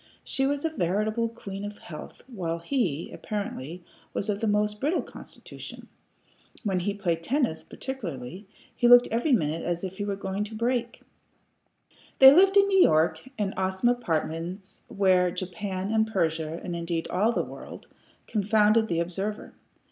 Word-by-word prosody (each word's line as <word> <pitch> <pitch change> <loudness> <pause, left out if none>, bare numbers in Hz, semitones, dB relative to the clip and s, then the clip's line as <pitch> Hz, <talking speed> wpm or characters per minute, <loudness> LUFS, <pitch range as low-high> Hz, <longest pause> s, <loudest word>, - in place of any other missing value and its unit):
She 270 0 0
was 285 +2 -1
a 325 - 0
veritable 215 - 0
queen 200 -3 -8
of 205 0 -6
health, 155 -3 -10
while 180 -10 -3
he, 170 - -1
apparently, 180 -5 -5 0.3
was 205 - -1
of 205 +1 -2
a - - +2
most 210 0 +1
brittle 310 +6 +1
constitution. - - -11 0.7
When 195 -4 0
he 200 +3 -2
played 170 -5 -1
tennis, 245 - 0
particularly, 185 - -7 0.3
he 240 - +3
looked 245 0 +8
every 240 +7 +1
minute 160 - +1
as 175 +1 -2
if 190 +1 -6
he - - -1
were 200 -1 -2
going 195 +1 -3
to 220 +1 -9
break. 240 +1 -1 1.1
They 265 0 +10
lived 385 +4 +6
in 400 - +7
New 385 -1 +4
York, 155 - +4 0.2
in 200 -2 -1
awesome 190 +5 +1
apartments 175 -4 -3
wherein 185 -2 +2
Japan 190 +1 -4
and 220 0 +2
Persia, 165 -5 -1
and 175 - -4
indeed 170 -1 -2
all 205 +6 +2
the - - 0
world, - - -10 0.4
confounded 215 +1 +3
the 170 -3 0
observer. 195 +5 -4
200 Hz, 155 wpm, -27 LUFS, 175-230 Hz, 1.1 s, They